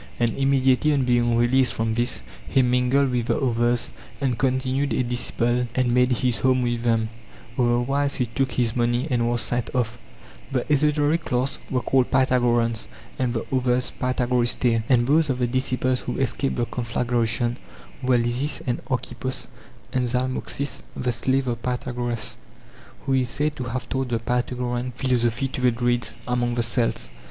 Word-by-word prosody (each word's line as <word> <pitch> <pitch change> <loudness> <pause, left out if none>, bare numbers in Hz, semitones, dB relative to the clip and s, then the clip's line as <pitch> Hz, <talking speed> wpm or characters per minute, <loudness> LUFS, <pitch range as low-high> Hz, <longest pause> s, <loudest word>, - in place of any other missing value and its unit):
And 120 -1 +2
immediately 135 +2 +2
on 135 -3 +1
being 120 -1 +2
released 125 +2 +3
from 115 0 0
this 120 - 0 0.2
he 135 - +3
mingled 125 +2 +2
with 120 -2 -1
the - - +1
others 120 -2 +1 0.3
and 130 -3 0
con 130 +2 +1
tinued 135 +2 -1
a - - +3
disciple 120 0 0
and 125 -2 +2
made 125 +1 +3
his 125 -2 +1
home 130 +1 +2
with 120 -1 -1
them; 115 -2 +1 0.5
other 120 -1 +2
wise 140 +3 0
he 125 - +1
took 130 +2 -2
his 120 -2 0
money 120 +3 +1
and 120 -1 +2
was 120 0 0
sent 120 -1 -1
off. 120 -2 -1 0.5
The - - +1
esotéric 150 +2 +2
class 130 +2 -1
were 125 -2 -1
called 130 -2 +2
Pythagoreans, 120 -3 +2 0.3
and 125 -2 0
the 115 - -2
others 125 0 +1
Pytha 125 -1 0
goristae. 120 -1 +2
And 120 -2 +4
those 150 +3 +3
of 130 - 0
the 125 - +1
disciples 130 0 0
who 125 - -4
escaped 135 +1 0
the 120 - 0
conflagration 120 0 -1 0.4
were 125 -1 +3
Lysis 120 +3 0
and 120 -2 -2
Archippos 130 0 -3 0.5
and 125 -2 +1
Zalmoxis 130 +3 -1
the 125 -1 -1
slave 130 +3 0
of 120 -1 -2
Pythagoras, 120 -2 -2 0.6
who 135 - -1
is 130 -2 +2
said 145 +3 0
to 130 - -4
have 125 +2 -4
taught 130 -1 -2
the 120 - +1
Pythagorean 125 +1 -2
philosophy 125 0 0
to 130 - -4
the 125 - +5
Druids 120 -2 0
among 120 -1 0
the 120 - +1
Celts.! 115 - -1
125 Hz, 170 wpm, -24 LUFS, 120-130 Hz, 0.6 s, the